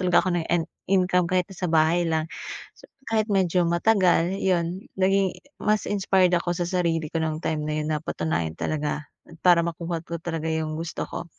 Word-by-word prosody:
talaga 180 -1 +4
ako 185 - 0
ng 160 - -5
en 170 -2 +2 0.3
income 180 -2 +3
kahit 185 0 +2
na - - -13
sa 180 +1 -2
bahay 165 +2 +4
lang. 160 0 0 0.5
So - - -19 0.2
Kahit 220 -1 +2
medyo 185 -2 +2
matagal 180 0 +3
yun, 180 0 0
naging 195 0 +2 0.3
mas 215 0 +1
inspired 190 -2 +2
ako 175 0 -1
sa 175 0 -1
sarili 170 -3 0
ko 165 - -5
nung 155 -1 -2
time 160 -2 -2
na 150 0 -2
yun, 150 - -3
napatunayan 150 - -2
talaga 150 -1 -1 0.3
at 165 - -13
para 175 -2 +7
makuha 170 0 -3
ko 170 -1 -5
talaga 165 -2 -4
yung 155 -1 -2
gusto 165 +1 -4
ko. - - -5
170 Hz, 190 wpm, -25 LUFS, 160-185 Hz, 0.5 s, para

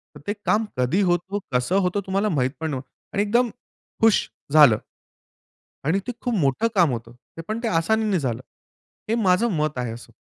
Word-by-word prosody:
तर - - -10
ते 205 - 0
काम 220 +1 +2
कधी 125 +10 +2
होतो, 185 +2 0
कसं 125 +9 +1
होतो 180 +3 0
तुम्हाला 195 +3 +1
माहीत 130 -7 +1
पण 160 0 -2
नव्हतं. 130 -1 -5 0.3
आणि 200 - +2
एकदम 235 +4 +2 0.5
हुश 225 -2 +4 0.3
झालं. 145 -8 +8 1.1
आणि 170 +6 +2
ते 245 - -2
खूप 245 - -1
मोठं 145 - +1
काम 175 -6 +4
होतं. 115 -1 -6 0.4
पण 215 +1 -2
ते 235 - 0
आसानीने 210 +3 +1
झालं. 125 -6 -2 0.7
हे 225 - +1
माझं 190 +4 +3
मत 150 -3 -1
आहे 125 -2 -2
असं. 115 - -11
175 Hz, 175 wpm, -23 LUFS, 135-210 Hz, 1.1 s, झालं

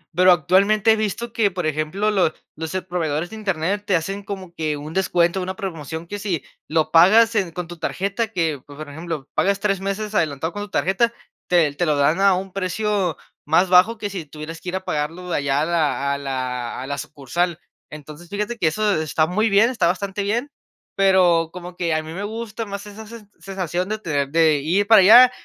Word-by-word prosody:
pero, 185 +1 +6
actualmente 195 +6 +4
he - - +5
visto 220 +2 -3
que, 215 -4 +2
por 180 -2 -4
ejemplo, 155 +8 -1
lo 185 -6 +2 0.2
los, 160 +3 -5
eh, 185 - -2
proveedores 170 -1 -2
de - - -7
Internet 195 0 -1
te 190 - +3
hacen 195 +5 -2
como 190 -3 -7
que 155 -3 -2
un 150 +2 -8
descuento, 180 -1 +1
una 185 +1 -4
promoción 165 -5 -6
que 205 +3 -6
si 190 -6 -2 0.2
lo 160 0 0
pagas 220 +8 +6
en 195 -5 0
con 175 0 -5
tu 175 -1 -9
tarjeta, 200 +4 -2
que, 165 - -2
pues, 145 0 -14
por 155 -1 -7
ejemplo, 155 -1 -6
pagas 200 0 +1
3 200 -2 0
meses 205 +2 -3
adelantado 160 -2 -1
con 205 - -5
tu 205 - -6
tarjeta, 215 +6 +1 0.4
te 165 -5 +3
te 175 +4 -1
lo 150 - +2
dan 150 +6 +2
a 195 -2 +5
un 190 0 -5
precio 195 -2 -1 0.3
más 175 +4 +3
bajo 185 +5 +5
que 205 -2 -4
si 180 -6 -5
tuvieras 155 +2 -8
que 180 - -5
ir 185 - -3
a 190 - -4
pagarlo 165 +4 -3
allá 140 0 +1
a - - +1
la 150 -4 0
a - - -2
la 130 -3 -4
a - - -6
la 140 0 -4
sucursal. 155 +4 -3 0.3
Entonces, 155 +3 -11
fíjate 210 +3 -3
que, 165 - +2
eso 205 0 +1
está 155 0 +1
muy 215 +6 +1
bien, 215 +5 +4
está 195 -9 +1
bastante 195 +3 -2
bien, 235 +8 -1 0.5
pero, 180 -4 +4
como 180 0 -9
que 170 -3 -1
a 155 - +1
mí 160 +1 -9
me 195 +3 -5
gusta 225 +1 -5
más 200 0 -6
esa 210 +2 -10
sen 215 -2 -12
sensación 185 -1 -3
de 215 - -1
tener, 145 -6 -1
de 160 -2 +3
ir 185 +8 +1
para 220 -3 +8
allá, 240 +6 +9
180 Hz, 215 wpm, -21 LUFS, 155-200 Hz, 0.5 s, allá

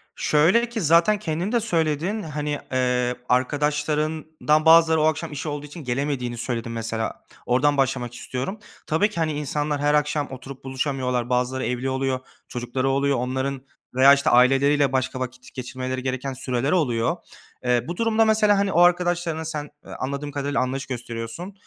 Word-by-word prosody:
Şöyle 185 +11 +3
ki 230 -3 -3
zaten 170 +6 +4
kendin 175 +1 -2
de 240 - +3
söyledin. 170 0 0
Hani, 150 -1 -3
eee, 125 -1 +1
arkadaşlarından 150 +3 0
bazıları 160 -1 +6
o - - +2
akşam 155 +1 0
işi 145 +2 -4
olduğu 145 0 -5
için 150 +2 -10
gelemediğini 125 -2 -2
söyledin 115 -1 -3
mesela. 115 -1 -4 0.2
Oradan 145 +4 +2
başlamak 130 -3 0
istiyorum. 130 - -4 0.3
Tabii 170 +7 +2
ki, 210 - -13
hani, 155 -1 0
insanlar 145 0 -2
her 145 0 +2
akşam 150 0 +1
oturup 130 +1 -9
buluşamıyorlar. 130 -2 -2
Bazıları 125 +1 0
evli 125 +2 -2
oluyor, 130 0 -1 0.3
çocukları 125 +2 -2
oluyor. 140 0 +1
Onların 130 +2 -2 0.3
veya, 135 +2 +8
işte, 140 0 +2
aileleriyle 135 +3 +4
başka 130 0 -1
vakit 125 0 -7
geçirmeleri 130 0 -4
gereken 130 +1 -3
süreler 130 +1 -1
oluyor. 150 -2 +1 0.5
Eee, 125 -1 +2
bu 175 - -5
durumda 225 -1 +3
mesela 215 -2 +4
hani 200 0 +1
o 170 - +2
arkadaşlarına 175 -2 +2
sen, 150 -2 -4 0.2
eee, - - -11
anladığım 140 +2 -3
kadarıyla 145 0 -1
anlayış 135 +2 -2
gösteriyorsun. 120 - -6
140 Hz, 160 wpm, -23 LUFS, 130-160 Hz, 0.5 s, veya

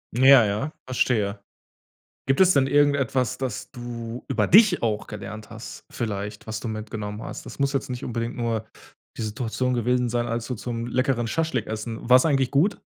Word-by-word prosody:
Ja, 130 -1 +7
ja. 105 +9 -2
Verstehe. 110 -5 0 0.9
Gibt 135 +4 +2
es 185 -1 +7
denn 135 -4 +3
irgendetwas, 140 -3 +2
das 130 -5 -4
du 120 0 -7
über 135 - +1
dich 200 -1 +6
auch 110 -2 -1
gelernt 105 +1 -8
hast 115 +1 -9
vielleicht, 105 -2 -4
was 110 0 -3
du - - -6
mitgenommen 110 -1 -5
hast? - - -7
Das - - -9
muss 140 0 +2
jetzt 135 -2 -2
nicht 125 +1 -4
unbedingt 115 0 -3
nur 115 -2 -2 0.5
die - - -4
Situation 115 +3 -2
gewesen 125 +1 +1
sein, 120 0 -1
als 115 0 -3
du 125 - -2
zum 115 +1 -4
leckeren 125 -1 0
Schaschlik 135 -4 -1
essen 110 +1 -4
war's 125 +4 +7
eigentlich 135 -4 +2
gut? 165 +9 +2
120 Hz, 175 wpm, -24 LUFS, 110-135 Hz, 0.9 s, Ja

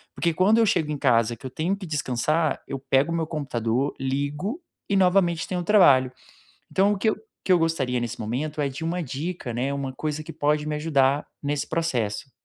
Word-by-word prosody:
Porque 170 -1 +1
quando 195 +7 +4
eu 230 - +5
chego 165 -6 +1
em 150 - -2
casa 115 -2 +2
que 130 - -15
eu - - -3
tenho 165 +9 -1
que 195 - -8
descansar, 155 +1 0
eu 135 - -4
pego 135 +4 +1
o - - 0
meu 160 -2 -1
computador, 135 -3 -1
ligo 145 - -2 0.3
e 200 - +2
novamente 180 -3 +3
tenho 180 -2 -2
trabalho. 140 -11 +5 0.6
Então, 195 +2 +3
o - - -3
que 220 +3 +2
eu - - 0 0.3
que 185 - +1
eu 180 - +6
gostaria 135 -7 0
nesse 120 -1 -4
momento 145 +7 -3
é 140 - 0
de 160 +5 -6
uma 175 +1 -1
dica 145 -2 -4
né, 130 +4 -1
uma 140 -1 -3
coisa 155 +2 -3
que - - -8
pode 150 +1 0
me 150 0 -2
ajudar 145 -2 +2 0.2
nesse 145 0 -1
processo. 130 -6 -2
150 Hz, 205 wpm, -25 LUFS, 135-170 Hz, 0.6 s, eu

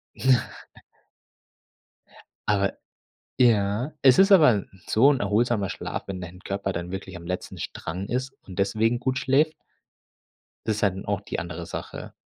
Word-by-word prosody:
Ja. 130 -2 +2 2.0
Aber 100 -1 +2 0.7
ja? 115 +2 +3
Es 130 -2 +6
ist 195 +1 +6
aber 140 - +6 0.2
so 130 +6 +5
'n 130 - -2
erholsamer 105 0 +1
Schlaf, - - -4
wenn 95 -1 -4
dein 90 +1 -9
Körper 100 0 -3
dann 85 +1 -5
wirklich 95 0 -6
am 85 - -10
letzten 90 +1 -4
Strang 90 +5 -5
ist 130 +2 -2
und 95 -1 -11
deswegen 110 +4 +1
gut 130 +1 -1
schläft. 145 +4 +2 1.1
Das 110 -2 0
ist 105 - -2
halt 95 -2 +2
dann 95 - -7
auch - - -1
die - - -4
andere 85 0 -6
Sache. - - -7
105 Hz, 150 wpm, -25 LUFS, 95-130 Hz, 2.0 s, Es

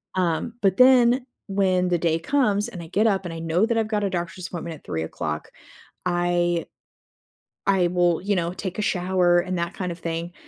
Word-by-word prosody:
um, 180 +5 0
but 195 -2 +2
then 255 -1 +6 0.2
when 185 -2 +1
the 175 - +2
day 165 -1 +1
comes 210 0 +1
and 180 -7 -8
I - - -10
get 210 +6 +2
up 195 -3 +1
and 170 - -5
I 165 - -6
know 165 +5 +1
that 230 -1 0
I've 220 -1 +1
got 210 -2 -1
a 200 - +1
doctor's 175 0 -4
appointment 170 -2 -6
at - - -18
3:00, 80 -1 -4 0.6
I 175 -1 +1 1.0
I 190 -3 +3
will, 175 -1 +2
you 200 +1 0
know, 170 -1 -1
take 190 0 -5
a - - +1
shower 180 -3 +2
and 185 +1 -2
that 170 +1 -2
kind 180 -2 -4
of 170 - -8
thing, 170 +1 -4
180 Hz, 200 wpm, -24 LUFS, 170-200 Hz, 1.0 s, then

